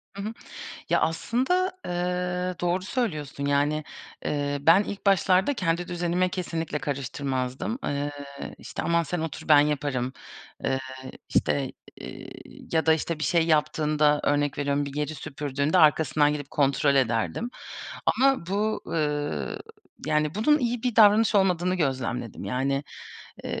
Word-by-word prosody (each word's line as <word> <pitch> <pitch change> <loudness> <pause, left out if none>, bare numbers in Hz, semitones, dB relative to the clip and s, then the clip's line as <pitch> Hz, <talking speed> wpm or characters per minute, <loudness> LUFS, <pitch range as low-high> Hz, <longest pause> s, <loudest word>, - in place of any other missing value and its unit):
Hı 200 - -5
hı. 215 +3 -4 0.6
Ya, - - +3
aslında, 260 - +1
ııı, 180 0 -2
doğru 175 +1 0
söylüyorsun. 155 - -3
Yani, 145 +2 +1 0.4
eee, 145 -1 -1
ben 165 +7 +6
ilk 200 0 -7
başlarda 195 +5 +4
kendi 175 -4 -1
düzenime 175 +1 0
kesinlikle 165 -4 -3
karıştırmazdım. 135 - -3
Iıı, 145 0 -1 0.5
işte - - -6
aman 170 0 +2
sen 165 +1 -3
otur 160 0 -5
ben 150 -2 +8
yaparım, 140 -4 -1 0.5
ııı, 135 0 +1 0.5
işte, 135 -2 +1 0.3
iii, - - -10
ya 160 0 +2
da 160 - +7
işte 160 0 -1
bir 155 - -2
şey 170 -2 +2
yaptığında 150 -1 +2
örnek 145 -1 +1
veriyorum 145 0 0
bir 140 - -7
yeri 150 +1 -2
süpürdüğünde 145 +3 -1
arkasından 150 -2 +4
gidip 145 -1 -5
kontrol 140 0 +2
ederdim. 130 - 0 0.6
Ama 265 -9 +3
bu, 210 +3 -1
ııı, 150 -2 -2 0.5
yani, 150 +1 +1
bunun 300 +9 +3
iyi 240 -2 -1
bir 245 -3 -1
davranış 215 0 +6
olmadığını 185 -2 +3
gözlemledim. 130 - -2
Yani, 135 +2 -1 0.6
ııı, - - -3
155 Hz, 135 wpm, -26 LUFS, 145-185 Hz, 0.6 s, ben